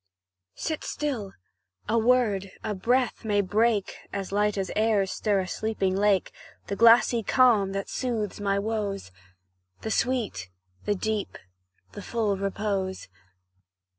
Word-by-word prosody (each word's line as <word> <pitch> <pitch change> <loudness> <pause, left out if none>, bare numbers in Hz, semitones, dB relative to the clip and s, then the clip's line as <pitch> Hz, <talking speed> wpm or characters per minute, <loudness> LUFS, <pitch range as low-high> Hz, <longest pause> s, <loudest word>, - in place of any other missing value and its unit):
Sit 315 -2 -3
still 245 -10 -3 0.5
a 220 - +1
word 220 -5 +2
a 215 - -2
breath 245 +6 0
may 210 -2 +1
break 210 +1 +1
(As 195 -1 -4
light 210 +1 +1 0.2
airs 210 -3 +2
stir 205 -3 +1
a 185 - -5
sleeping 195 -2 -1
lake) 200 -1 +2 0.3
The 200 - -3
glassy 230 +1 +6
calm 215 -4 +3
that 195 0 -3
soothes 220 -6 -3
my 200 -1 +1
woes 200 - -3 0.7
The 220 - -4
sweet, 230 - -1 0.4
the 205 - +1
deep, 215 +1 -2 0.5
the 205 - -8
full 215 -2 -1
repose. 195 - -2
210 Hz, 125 wpm, -26 LUFS, 195-230 Hz, 0.7 s, glassy